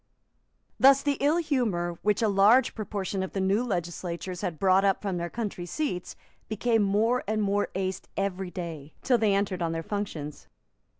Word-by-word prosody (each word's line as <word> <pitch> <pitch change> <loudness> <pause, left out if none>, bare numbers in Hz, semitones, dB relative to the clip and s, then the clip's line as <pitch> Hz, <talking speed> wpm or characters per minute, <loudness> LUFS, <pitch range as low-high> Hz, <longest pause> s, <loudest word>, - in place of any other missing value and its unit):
Thus 275 +1 +6
the 285 -2 0
ill 295 +4 +3
humour 220 - -1
which 210 +2 +1
a - - +4
large 205 +6 +4
proportion 200 -3 -3
of 190 - -4
the 195 - -2
new 195 +5 +2
legislators 175 -3 -4
had 165 -3 -3
brought 190 +1 +4
up 195 -1 +2
from 195 -3 -3
their 170 0 -3
country 200 -4 -4
seats 185 - -3 0.3
became 225 +1 +1
more 215 +5 +2
and 215 +1 0
more 205 0 +1
aced 190 0 -2
every 195 -1 -2
day, 160 -4 -7
till 250 -3 +3
they 210 -2 +3
entered 195 -2 -1
on 165 -1 0
their 165 0 -3
functions. 165 -7 -5
195 Hz, 175 wpm, -27 LUFS, 180-220 Hz, 0.3 s, Thus